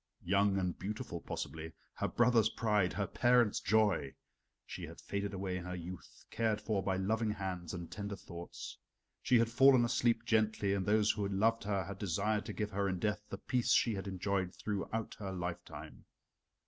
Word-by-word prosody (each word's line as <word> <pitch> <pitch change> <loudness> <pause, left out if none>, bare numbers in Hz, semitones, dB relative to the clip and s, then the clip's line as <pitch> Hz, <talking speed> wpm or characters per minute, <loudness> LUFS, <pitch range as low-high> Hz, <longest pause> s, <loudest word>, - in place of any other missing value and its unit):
Young 100 +2 +3
and 90 -2 -1
beautiful 105 -3 -4
possibly 80 +2 -5 0.2
her - - -1
brothers' 120 -3 +4
pride, 105 -6 +1
her 100 - -1
parents' 120 -1 +3
joy. 100 -9 +2 0.5
She - - -6
had - - -11
faded 100 0 -3
away 95 -2 -3
in 90 - -6
her 90 0 -4
youth, 90 +1 -9
cared 110 -2 +1
for 105 -2 -1
by 95 0 0
loving 110 +4 0
hands 95 -4 -3
and 85 -1 -6
tender 100 +2 -4
thoughts. 85 -2 -9 0.4
She 125 - +4
had 115 0 +2
fallen 130 0 +6
asleep 115 -1 +1
gently, 110 -3 +2
and 100 -1 -1
those 105 +1 +4
who 105 -2 -2
loved 110 +3 +1
her 100 -2 0
had 95 +2 -7
desired 105 +3 0
to - - -4
give 105 -1 -3
her 100 0 0
in 95 - -1
death 105 +3 -1
the - - -5
peace 125 -4 +1
she 115 - +4
had 100 0 -4
enjoyed 95 -1 -1
throughout 105 +2 -3
her 100 -2 -4
lifetime. 90 -1 -6
100 Hz, 180 wpm, -34 LUFS, 95-110 Hz, 0.5 s, fallen